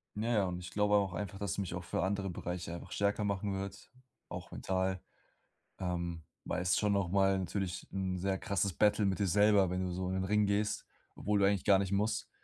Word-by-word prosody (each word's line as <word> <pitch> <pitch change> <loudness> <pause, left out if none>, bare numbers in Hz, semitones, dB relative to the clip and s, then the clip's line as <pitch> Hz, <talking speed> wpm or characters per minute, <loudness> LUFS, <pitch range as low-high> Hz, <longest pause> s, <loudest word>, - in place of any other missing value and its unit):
Ja 110 +3 -1
ja, 105 -3 +3
und 90 -1 -3
ich 90 - -8
glaube 105 0 +3
auch 100 -2 +2
einfach, 95 +2 -4
dass 100 -1 -1
ich - - -5
mich 90 -3 -3
auch 90 -1 -5
für 85 - -1
andere 100 +1 -1
Bereiche 90 -1 -4
einfach 85 - -8
stärker 100 +1 +1
machen 100 0 -1
wird, 100 +1 -6 0.4
auch - - -7
mental. 95 0 -1 0.8
Ähm, 85 -2 -3 0.2
weil 90 - -1
es 90 0 +2
schon 105 -1 +2
noch 100 -3 +1
mal 95 0 +3
natürlich 95 -1 -3
'n 95 -1 -2
sehr 95 +1 0
krasses 100 -2 0
Battle 105 +2 +3
mit 95 0 0
dir 100 - +2
selber, 100 0 +5
wenn 90 +1 -1
du 90 - -2
so 90 +1 -2
in 95 - -1
den 95 0 0
Ring 105 +2 +3
gehst, 100 +1 0 0.3
obwohl 105 0 +1
du 100 - +5
eigentlich 100 -1 +2
gar 100 -2 +6
nicht 95 -1 -1
musst 105 +3 0
95 Hz, 225 wpm, -33 LUFS, 90-100 Hz, 0.8 s, gar